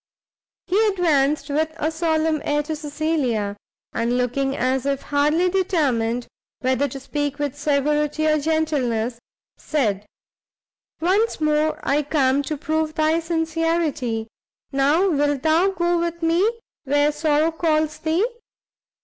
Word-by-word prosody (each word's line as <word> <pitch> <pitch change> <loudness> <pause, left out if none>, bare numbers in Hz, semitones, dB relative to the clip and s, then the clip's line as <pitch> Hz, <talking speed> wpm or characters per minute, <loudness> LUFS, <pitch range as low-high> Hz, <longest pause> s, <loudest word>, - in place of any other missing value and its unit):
He 390 +4 +2
advanced 300 -7 +1
with 315 +2 0
a 315 - -1
solemn 320 -1 0
air 295 0 0
to 310 +1 -4
Cecilia, 295 -9 -1 0.4
and, 235 +2 0
looking 270 +2 0
as 260 +1 0
if 275 -1 -1
hardly 300 +5 +2
determined 275 -11 0 0.4
whether 260 +2 +1
to 275 +1 -7
speak 290 +1 -3
with 290 -2 -2
severity 295 +1 0
or 305 0 +3
gentleness, 270 -7 0 0.4
said, 210 -9 -1 0.9
"once 395 +7 +1
more 305 0 +1
I 290 +2 +3
come 280 -2 +2
to 305 - -2
prove 310 +1 -1
thy 315 +1 +2
sincerity; 325 -8 -1 0.4
now 290 +7 +3
wilt 290 -5 +1
thou 325 +5 +3
go 345 -2 0
with 340 0 -3
me 345 +7 +3 0.3
where 290 +1 +2
sorrow 305 +1 +1
calls 315 -2 0
thee? 325 +6 +1
300 Hz, 125 wpm, -22 LUFS, 275-320 Hz, 0.9 s, or